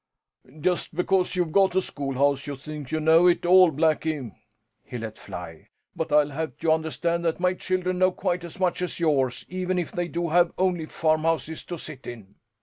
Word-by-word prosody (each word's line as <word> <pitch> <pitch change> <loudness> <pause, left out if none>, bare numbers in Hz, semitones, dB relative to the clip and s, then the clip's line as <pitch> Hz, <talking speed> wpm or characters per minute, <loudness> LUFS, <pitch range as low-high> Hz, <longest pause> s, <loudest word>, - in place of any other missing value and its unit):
"Just 175 0 -1
because 180 +1 +1
you've 175 -3 0
got 190 0 +3
a - - +5
schoolhouse 140 -1 -1
you 145 - -4
think 145 0 -8
you 155 - 0
know 160 +3 +5
it 175 0 +2
all, 185 0 +7
Blackie!" 155 -3 0 0.5
he 125 - -7
let 110 -2 -6
fly. - - -9 0.3
"But 160 -1 -3
I'll 150 0 +4
have 160 +3 -4
you 165 -1 +1
understand 165 +2 0
that 165 0 0
my 180 +1 +2
children 185 0 -2
know 185 0 +4
quite 180 -1 -2
as 170 +1 -10
much 180 -1 0
us 180 - -3
yours, 135 -7 +1
even 185 0 -2
if 175 -3 -2
they 175 0 -2
do 170 +2 -2
have 175 +1 +3
only 180 -4 0
farmhouses 160 0 0
to 175 - -5
sit 155 -4 -9
in." 105 -5 -9
165 Hz, 190 wpm, -25 LUFS, 150-180 Hz, 0.5 s, all